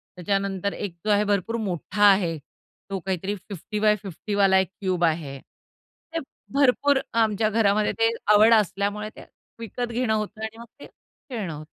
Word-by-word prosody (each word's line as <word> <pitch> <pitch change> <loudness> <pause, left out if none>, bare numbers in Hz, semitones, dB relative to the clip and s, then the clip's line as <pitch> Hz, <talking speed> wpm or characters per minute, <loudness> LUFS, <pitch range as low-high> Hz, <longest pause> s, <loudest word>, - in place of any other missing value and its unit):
त्याच्यानंतर 195 +1 -1
एक 190 -5 -5
जो 215 - +2
आहे 205 0 +4
भरपूर 205 +2 0
मोठा 195 +2 -2
आहे 175 -5 +1 0.5
तो 195 -1 -3
काहीतरी 190 +2 -2
50 205 +2 -7
बाय 210 0 +4
50 195 +1 +1
एक 190 - 0
क्यूब 185 -2 0
आहे. 155 -4 -2
ते 330 - -11 0.3
भरपूर 280 0 +3
आमच्या 220 -1 +2
घरामध्ये 215 -1 +2
ते 225 0 +4 0.2
आवड 215 +2 +7
असल्यामुळे 210 0 +1
ते - - -11 0.4
विकत 235 +2 -4
घेणं 235 -2 0
होतं 215 0 -3
आणि 220 +1 -5
मग 235 - -9
ते - - -10
खेळणं 215 - -8
होतं. 150 +1 -8
205 Hz, 160 wpm, -24 LUFS, 190-220 Hz, 0.5 s, आवड